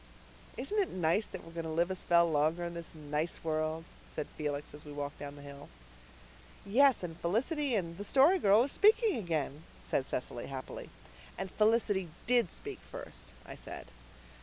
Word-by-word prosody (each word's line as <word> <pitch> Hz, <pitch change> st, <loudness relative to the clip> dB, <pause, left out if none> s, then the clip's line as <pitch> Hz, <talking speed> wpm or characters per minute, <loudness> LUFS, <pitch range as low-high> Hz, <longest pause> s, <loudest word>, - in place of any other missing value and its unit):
"Isn't 420 Hz, +1 st, -1 dB
it 385 Hz, -, +2 dB
nice 180 Hz, +4 st, +1 dB
that 190 Hz, -, -8 dB
we're 165 Hz, -, -11 dB
going 165 Hz, 0 st, -3 dB
to -, -, -3 dB
live 170 Hz, +3 st, +1 dB
a -, -, -1 dB
spell 170 Hz, -1 st, +4 dB
longer 160 Hz, +2 st, +2 dB
in 170 Hz, 0 st, -3 dB
this 170 Hz, -1 st, -7 dB
nice 150 Hz, +2 st, -2 dB
world?" 155 Hz, 0 st, -1 dB, 0.3 s
said -, -, -3 dB
Felix, 150 Hz, -1 st, -3 dB
as 150 Hz, +1 st, -10 dB
we 150 Hz, -, -9 dB
walked 145 Hz, 0 st, -5 dB
down 145 Hz, 0 st, -6 dB
the 145 Hz, -, -11 dB
hill. 140 Hz, 0 st, -10 dB, 1.0 s
"Yes, 260 Hz, +3 st, +5 dB
and 165 Hz, -1 st, -5 dB
Felicity 255 Hz, -, +1 dB
and 170 Hz, -3 st, -2 dB
the -, -, -3 dB
Story 280 Hz, -, +5 dB
Girl 205 Hz, -, +6 dB
are -, -, 0 dB
speaking 430 Hz, -, +4 dB
again," 160 Hz, -7 st, -2 dB, 0.2 s
said 135 Hz, -, 0 dB
Cecily 120 Hz, -1 st, -3 dB
happily. 135 Hz, -1 st, -6 dB, 0.5 s
"And 190 Hz, 0 st, -4 dB
Felicity 210 Hz, -4 st, +2 dB, 0.2 s
DID 240 Hz, -5 st, +4 dB
speak -, -, -7 dB
first," -, -, -9 dB, 0.2 s
I -, -, -8 dB
said. -, -, -8 dB
170 Hz, 180 wpm, -33 LUFS, 150-220 Hz, 1.0 s, Girl